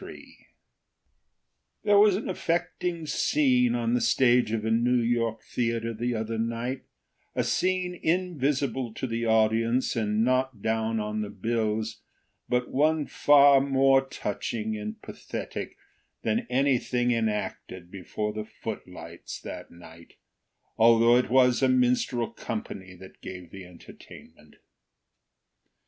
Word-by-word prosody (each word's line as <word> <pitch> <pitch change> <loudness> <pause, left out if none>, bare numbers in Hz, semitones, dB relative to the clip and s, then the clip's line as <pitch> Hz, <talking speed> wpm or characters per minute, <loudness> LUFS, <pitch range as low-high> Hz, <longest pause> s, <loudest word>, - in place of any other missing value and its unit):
FORD - - -9 1.7
There 205 -1 +5
was 205 -2 +5
an 205 - -4
affecting 170 -1 -2
scene 125 -5 +2
on 120 -1 -1
the 125 - +1
stage 125 -3 +3
of 110 -1 -2
a 110 - 0
New 120 +2 +2
York 115 -1 -1
theater 115 -1 -2
the 120 +2 -2
other 110 0 -3
night—a 115 - -5
scene 185 -1 0
invisible 140 -8 -1
to - - -3
the 115 -1 -2
audience 115 +3 +2
and 110 -1 0
not 130 -1 0
down 110 0 0
on 105 0 -3
the 105 - -4
bills, 110 +1 -2 0.5
but 125 0 0
one 155 +2 +2
far 140 -1 +5
more 135 -1 +4
touching 110 -3 -4
and 105 0 -6
pathetic - - -7 0.5
than 110 -1 -1
anything 125 -2 +1
enacted 105 -5 -3
before 100 +3 -4
the 110 0 -4
footlights 90 -7 -8
that - - -8
night, 85 -1 -15 0.6
although 115 +1 +6
it 125 - +2
was 125 0 +4
a 130 - +3
minstrel 125 -2 +1
company 95 -4 -6
that 95 +1 -15
gave 90 -3 -9
the 95 -1 -10
entertainment. 90 -2 -15
115 Hz, 125 wpm, -27 LUFS, 110-130 Hz, 1.7 s, although